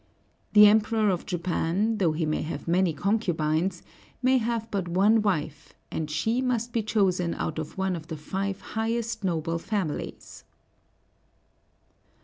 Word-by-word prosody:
The 210 0 +9
Emperor 215 0 +4
of 180 - -3
Japan, 185 +4 0
though 170 -5 +2
he 160 +1 -1
may 155 - -1
have 150 -1 -5
many 175 +1 +3
concubines, 175 -1 0 0.4
may 260 0 +4
have 230 -1 -2
but 195 -3 -2
one 200 +6 +4
wife, 155 -7 -2 0.2
and 155 -1 -3
she 220 +11 0
must 240 -2 -1
be 230 - +1
chosen 185 -5 +1
out 155 0 -3
of 155 - -6
one 190 -1 0
of 160 -2 -8
the 160 - -5
five 195 +5 -3
highest 225 0 -2
noble 165 -2 -1
families. 185 -5 -4
190 Hz, 140 wpm, -27 LUFS, 165-220 Hz, 0.4 s, The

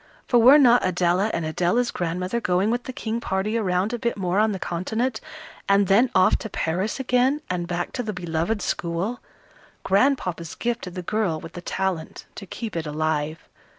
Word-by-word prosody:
For 240 - +4
were 255 +6 +8
not 245 -4 +5
Adela 185 +2 +1
and 165 - -2
Adela's 180 +10 +1
grandmother 180 +6 -2
going 185 +2 +1
with 240 +1 -2
the - - -4
King 230 -2 -3
party 195 +2 -1
around 195 0 0
a 240 - -2
bit 235 0 -1
more 185 0 0
on 215 0 +3
the 195 - -3
continent, 220 +8 -2 0.5
and 200 0 +5
then 215 +7 +4
off 185 0 +5
to 220 - -6
Paris 185 +8 -2
again, 255 +2 +2
and 175 -1 -2
back 175 0 -3
to 250 - -3
the 220 -3 -3
beloved 175 +3 -2
school 175 +8 -2 0.6
Grandpapa's 190 - +1
gift 240 -2 -2
to - - -5
the 180 0 -7
girl 190 -5 -1
with 165 +1 -10
the 175 - -7
talent, 180 -3 -3
to 195 - -9
keep 220 +2 -6
it 165 -2 -3
alive! 155 +1 -2
190 Hz, 185 wpm, -24 LUFS, 175-230 Hz, 0.6 s, were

